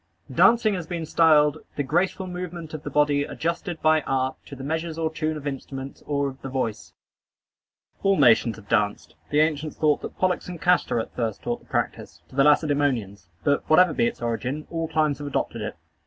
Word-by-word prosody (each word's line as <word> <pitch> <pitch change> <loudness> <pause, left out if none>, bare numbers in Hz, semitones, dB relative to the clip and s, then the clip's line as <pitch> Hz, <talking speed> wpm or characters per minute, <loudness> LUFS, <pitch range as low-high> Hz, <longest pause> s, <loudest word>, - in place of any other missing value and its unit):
Dancing 230 -2 +5
has 180 -4 -4
been 170 -2 -4
styled 155 -2 +4 0.2
"the 145 - -1
graceful 175 +6 0
movement 180 -3 -6
of 155 - -5
the - - -5
body 145 -1 +2
adjusted 170 +3 -3
by 155 0 +4
art, 130 -1 -1
to 140 - -8
the 135 - -9
measures 160 +2 -3
or 160 -1 -1
tune 155 0 -2
of 150 - -9
instruments, 135 -1 -6
or 140 -1 0
of 135 -1 -8
the 135 - -6
voice." 125 -5 -3 1.1
All 195 -1 +3
nations 115 -1 +5
have 105 -2 -15
danced. 105 -2 0 0.2
The 150 +1 +3
ancients 155 -1 -1
thought 150 -2 +2
that - - -8
Pollux 185 -1 0
and 175 -2 -7
Castor 180 -7 +2
at 110 - -6
first 115 -3 -3
taught 120 0 -2
the - - -24
practice - - -3
to - - -15
the 135 - +4
Lacedæmonians; 145 - +1 0.2
but, 145 -1 +2
whatever 165 +1 +6
be 235 - +2
its 235 - -5
origin, 130 +6 -2
all 165 -1 -2
climes 155 -2 +1
have 145 - -5
adopted 140 - -2
it. - - -4
150 Hz, 200 wpm, -25 LUFS, 135-165 Hz, 1.1 s, whatever